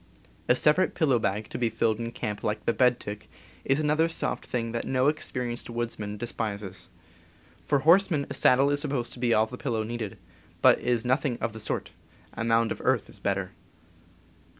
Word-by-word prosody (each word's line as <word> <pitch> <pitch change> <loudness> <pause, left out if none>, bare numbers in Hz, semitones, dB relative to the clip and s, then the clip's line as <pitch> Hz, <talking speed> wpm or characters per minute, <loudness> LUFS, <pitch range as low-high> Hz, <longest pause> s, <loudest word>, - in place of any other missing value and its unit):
A 125 - +6
separate 150 +8 +3
pillow 140 -8 +3
bag, 105 +1 -1
to - - -4
be 120 -2 +1
filled 110 0 0
in 115 0 -4
camp 105 -3 -4
like 105 0 -2
the 115 - +2
bed 125 -1 +3
tick, 105 +1 -8 0.3
is 135 +2 +1
another 155 +2 +2
soft 165 - -2
thing 115 -2 -2
that 115 0 -2
no 130 0 +1
experienced 125 -6 -2
woodsman 115 -3 -4
despises. 100 -4 -5 0.8
For 145 - +3
horsemen 170 -2 +4
a - - -6
saddle 135 +3 +4
is 145 - 0
sup 150 - -2
posed 125 -4 -2
to - - -10
be 120 -1 +1
all 110 - +4
the 125 +3 -9
pillow 110 -2 -1
needed; 110 -2 -5 0.4
but - - +6
it - - -8
is 120 -1 +1
nothing 130 0 +1
of 115 -2 -2
the 110 - -8
sort 105 - -3 0.2
— - - -28
a 115 - -4
mound 115 0 +2
of - - -4
earth - - +1
is - - -13
better. 95 -2 -1
120 Hz, 200 wpm, -27 LUFS, 110-135 Hz, 0.8 s, A